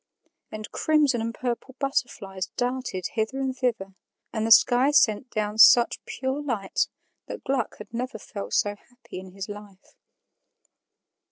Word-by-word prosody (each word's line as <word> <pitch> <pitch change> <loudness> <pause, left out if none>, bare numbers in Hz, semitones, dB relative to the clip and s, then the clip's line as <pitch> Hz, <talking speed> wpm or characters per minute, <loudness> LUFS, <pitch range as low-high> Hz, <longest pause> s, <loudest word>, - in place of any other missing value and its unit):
And 215 0 -7
crimson 295 -6 +2
and 230 +1 -2
purple 250 +2 -4
butterflies 195 -9 -2
darted 245 -7 -2
hither 220 +4 -1
and 265 -1 -2
thither, 230 -7 -2 0.4
and 220 0 -1
the - - -2
sky 245 +4 +6
sent 250 -4 +3
down 215 -1 -3
such 240 0 +7
pure 265 +2 -3
light 225 -9 -1 0.4
that - - -7
Gluck 265 -4 -1
had 210 - -12
never 245 0 -3
felt 200 -1 -6
so 205 0 +1
happy 240 -1 -12
in 185 -1 -12
his 195 0 -6
life. 205 -2 -11
235 Hz, 145 wpm, -25 LUFS, 205-260 Hz, 0.4 s, such